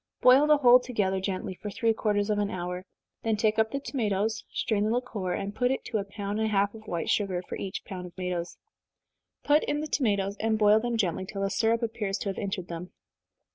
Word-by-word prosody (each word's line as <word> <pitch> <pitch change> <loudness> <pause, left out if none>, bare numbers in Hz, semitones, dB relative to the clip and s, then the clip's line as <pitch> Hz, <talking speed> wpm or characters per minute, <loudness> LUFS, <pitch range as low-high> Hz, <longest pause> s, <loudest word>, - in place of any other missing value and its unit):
Boil 260 +4 +6
the 300 0 +6
whole 250 -3 +7
together 210 -7 -1
gently, 190 0 -3
for 205 +3 -7
three 225 +2 +1
quarters 210 -1 0
of 205 - +1
an 205 -1 0
hour 180 0 -4 0.3
then 225 -1 0
take 215 0 +2
up 220 0 +3
the 275 - -2
tomatoes, 220 -5 -1
strain 210 -2 0
the 215 - +1
liquor, 225 -6 -2
and 200 +2 -3
put 245 +3 +1
to 250 -3 -1
it - - 0
a - - -4
pound 205 +1 -4
and 220 - +1
a - - -2
half 200 0 +2
of 220 -1 -12
white 170 -4 -2
sugar, 195 -4 +1
for - - -4
each 190 -1 -5
pound 180 -2 -6
of 175 - -15
tomatoes. 180 -2 -3 0.9
Put 295 +1 +4
in 295 - -1
the 305 - -2
tomatoes, 200 -9 0
and 220 0 +1
boil 210 0 +5
them 240 0 -1
gently, 185 -3 -1
till 195 0 -4
the 195 - 0
syrup 230 +1 +1
appears 210 -3 -2
to 200 - -3
have 195 - -4
entered 190 -3 -3
them. 170 +1 -6
210 Hz, 230 wpm, -28 LUFS, 195-225 Hz, 0.9 s, whole